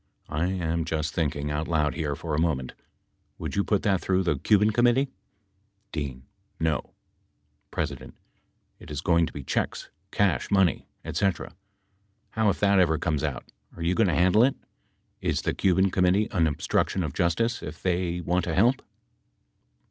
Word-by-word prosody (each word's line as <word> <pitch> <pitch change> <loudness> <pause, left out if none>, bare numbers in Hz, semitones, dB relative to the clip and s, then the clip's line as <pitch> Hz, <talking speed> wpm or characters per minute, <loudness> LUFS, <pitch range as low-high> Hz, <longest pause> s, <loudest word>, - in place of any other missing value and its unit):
I 80 +4 0
am 85 -3 -1
just 80 -2 -2
thinking 75 -2 -1
out 75 +2 -2
loud 75 -3 +1
here 75 -4 -2
for 80 +2 -5
a 75 - +1
moment. 70 -7 -1 0.6
Would - - -5
you 100 - +2
put 105 0 0
that 100 -4 +2
through 95 0 +1
the 80 -6 0
Cuban 105 +4 +4
Committee? 120 +4 +3 0.8
D. 70 -5 -4 0.4
No. 80 -3 -1 0.8
P. - - -1 1.0
It - - -13
is 75 -2 -4
going 85 0 +3
to - - -8
be 70 - -7
checks, - - -2 0.2
cash 95 -10 +1
money, 95 -4 +2 0.2
etc. 100 -3 -1 0.8
How 110 -1 +2
if 95 - -1
that 100 -1 +4
ever 80 -3 +3
comes 75 -3 -1
out, - - -4 0.3
are 85 - -5
you 85 +2 +2
going 110 +2 +3
to 80 - +1
handle 95 +6 +5
it? 135 +1 +3 0.7
Is - - -1
the - - 0
Cuban 95 0 +2
Com 90 0 +2
mittee 100 +4 +2
an 85 -3 +3
obstruction 85 +4 0
of 75 -4 -3
justice, 115 +7 0
if - - -8
they 90 -1 0
want 90 +1 0
to 80 - -2
help 120 +7 +3
85 Hz, 170 wpm, -26 LUFS, 80-100 Hz, 1.0 s, handle